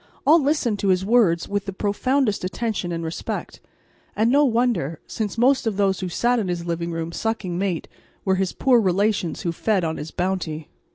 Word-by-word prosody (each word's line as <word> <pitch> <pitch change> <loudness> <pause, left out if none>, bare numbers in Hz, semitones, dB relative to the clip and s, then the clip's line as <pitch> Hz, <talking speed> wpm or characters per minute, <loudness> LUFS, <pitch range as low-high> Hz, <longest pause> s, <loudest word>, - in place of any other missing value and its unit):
All 315 +3 +6
listened 270 -7 +1
to 200 - -1
his 185 0 +2
words 195 -7 +3
with 205 0 -2
the 195 - -3
profoundest 210 +4 0
attention 195 -1 -2
and 165 -1 -3
respect, 160 0 -5 0.5
and 225 +3 +2
no 285 +2 +5
wonder, 230 - +1
since 215 -1 -4
most 255 +1 +3
of 210 -3 -1
those 195 -2 +2
who 185 - -3
sat 240 +7 +1
in 205 - -2
his 175 -1 -3
living 170 0 -2
room, 165 0 -3
sucking 215 -3 -2
mate, 180 -2 -2 0.4
were 190 - +3
his 190 -1 0
poor 250 -3 +3
relations 195 -3 0
who 170 - -1
fed 195 +2 0
on 160 -1 -2
his 150 - -6
bounty. 175 -4 -3
195 Hz, 190 wpm, -23 LUFS, 175-230 Hz, 0.5 s, All